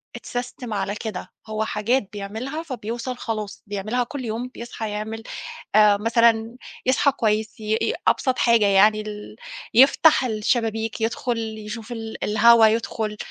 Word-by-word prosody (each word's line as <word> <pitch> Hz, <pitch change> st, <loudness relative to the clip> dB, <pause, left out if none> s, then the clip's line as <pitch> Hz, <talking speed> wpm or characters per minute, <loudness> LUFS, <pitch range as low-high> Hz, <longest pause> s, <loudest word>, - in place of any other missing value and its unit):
اتساستم 245 Hz, -2 st, -5 dB
على 200 Hz, 0 st, -2 dB
كده 210 Hz, -4 st, -6 dB, 0.2 s
هو 220 Hz, 0 st, -2 dB
حاجات 215 Hz, +1 st, 0 dB
بيعملها 225 Hz, +10 st, -5 dB
فبيوصل 245 Hz, -2 st, -5 dB
خلاص 215 Hz, -4 st, -5 dB
بيعملها 215 Hz, +5 st, -1 dB
كل 260 Hz, 0 st, -6 dB
يوم 230 Hz, +3 st, -3 dB
بيصحى 230 Hz, -3 st, -6 dB
يعمل 220 Hz, +2 st, -5 dB, 0.5 s
آآ 210 Hz, -1 st, +6 dB
مثلًا 230 Hz, +1 st, +2 dB, 0.3 s
يصحى 275 Hz, +2 st, +3 dB
كويس 215 Hz, -1 st, -1 dB
ي 215 Hz, +1 st, 0 dB
ي -, -, 0 dB
أبسط 260 Hz, -2 st, +1 dB
حاجة 230 Hz, -3 st, +4 dB
يعني 210 Hz, +2 st, +5 dB
ال 210 Hz, 0 st, -8 dB, 0.4 s
يفتح 270 Hz, +3 st, +6 dB
الشبابيك 225 Hz, 0 st, -1 dB
يدخُل 230 Hz, +1 st, -1 dB, 0.2 s
يشوف 220 Hz, +2 st, -7 dB
ال 225 Hz, -1 st, -6 dB
الهوا 225 Hz, +1 st, +6 dB
يدخُل 220 Hz, -1 st, -1 dB
225 Hz, 135 wpm, -23 LUFS, 215-240 Hz, 0.5 s, آآ